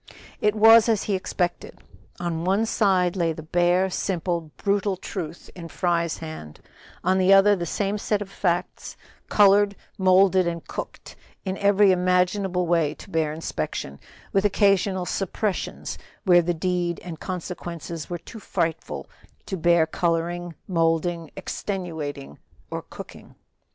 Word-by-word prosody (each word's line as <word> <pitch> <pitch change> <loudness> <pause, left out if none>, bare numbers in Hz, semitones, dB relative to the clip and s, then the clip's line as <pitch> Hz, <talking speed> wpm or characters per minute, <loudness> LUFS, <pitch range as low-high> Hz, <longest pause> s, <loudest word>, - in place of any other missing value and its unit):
It 210 0 +2
was 225 +1 +7
as 220 -3 +2
he 205 - -1
expected. 180 -2 -2 0.4
On 170 -2 -2
one 195 +5 +2
side 190 -5 +2
lay 170 -3 +1
the 160 - -9
bare, 175 +3 +2
simple, 175 -3 -2
brutal 200 -1 0
truth 170 -3 -7
in 170 -2 -8
Fry's 170 -1 0
hand, 155 - -8 0.4
on 185 +2 +2
the 185 +1 +4
other 200 +1 +6
the 175 -3 -4
same 200 +4 -1
set 210 0 0
of 205 - -5
facts 180 -2 -2 0.3
colored, 205 0 +5 0.2
molded 185 -1 +4
and 170 -1 -4
cooked - - -7 0.3
in 190 0 -2
every 200 0 +5
imaginable 180 0 +1
way 165 -3 +1
to 200 - -13
bear 160 -2 +1
inspection, 150 - -4 0.3
with 195 - +3
occasional 195 -2 +2
suppressions 195 +2 -3 0.2
where 175 -3 +6
the 175 0 -1
deed 175 0 -1
and 165 -3 -7
consequences 170 -3 -6
were 175 - -3
too 170 +6 -11
frightful 165 -5 -3 0.4
to 195 - -3
bear 170 -1 +4
coloring, 170 +1 -1
molding, 165 -1 0
extenuating 160 - -5 0.3
or - - -3
cooking. - - -12
180 Hz, 135 wpm, -24 LUFS, 170-195 Hz, 0.4 s, was